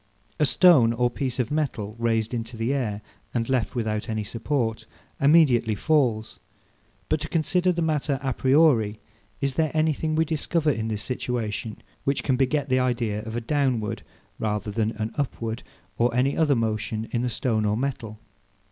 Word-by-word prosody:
A 150 - +4
stone 135 -12 +6
or 120 +1 +1
piece 130 -2 -3
of 125 -1 -1
metal 120 -9 -2
raised 115 -1 0
into 115 0 -4
the 115 +4 0
air, 110 -7 -2 0.3
and 115 -1 0
left 130 -3 0
without 110 -3 -2
any 110 -1 -1
support, 115 0 -2 0.3
immediately 140 -7 +4
falls: 120 -4 +1 0.7
but 155 - +1
to 155 - -5
consider 180 +3 +2
the 170 -1 -1
matter 150 -3 0
a 135 -1 0
priori, 130 -7 +3 0.4
is 140 -1 0
there 155 +2 +1
anything 155 0 +1
we 160 +1 +3
discover 160 0 0
in 110 -3 -2
this 110 -1 -3
situation 115 -4 -3 0.3
which 140 0 0
can 130 - +2
beget 140 +2 +1
the 130 -1 +2
idea 120 -4 0
of 110 +1 -7
a 120 - -1
downward, 125 -4 0 0.4
rather 105 -1 -2
than 110 0 0
an 110 0 -3
upward, 115 -4 -3 0.4
or 120 +1 +3
any 130 +3 +2
other 150 -4 +3
motion, 110 -1 -2
in 120 - 0
the 125 - 0
stone 115 -2 0
or 105 0 +1
metal? 120 -5 -3
125 Hz, 170 wpm, -25 LUFS, 110-145 Hz, 0.7 s, stone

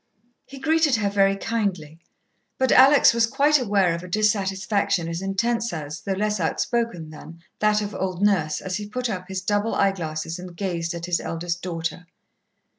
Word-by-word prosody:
He 275 - -11
greeted 315 -1 +2
her 205 -3 0
very 195 -1 +3
kindly, 195 -8 -3 0.6
but 260 -1 +1
Alex 270 +1 +7
was 230 -1 +2
quite 290 +5 +3
aware 200 -7 +2
of 170 - -4
a 180 - -9
dissatisfaction 200 -2 0
as 165 +1 -4
intense 230 +4 -1
as, 155 -1 -6
though 195 - -2
less 210 +1 -1
outspoken 175 -1 -1
than, 165 +2 -12 0.2
that 210 0 +2
of 205 0 -5
old 185 -2 -3
Nurse 170 -7 +1
as 185 -1 -3
he 205 -1 -7
put 250 +1 -2
up 185 -2 -5
his 190 -1 -4
double 205 +3 0
eye 195 - +3
glasses 165 -2 -5
and 180 -1 -10
gazed 170 -3 -2
at 170 0 -5
his 175 -1 0
eldest 170 +1 -4
daughter. 165 0 -4
195 Hz, 180 wpm, -23 LUFS, 170-215 Hz, 0.6 s, Alex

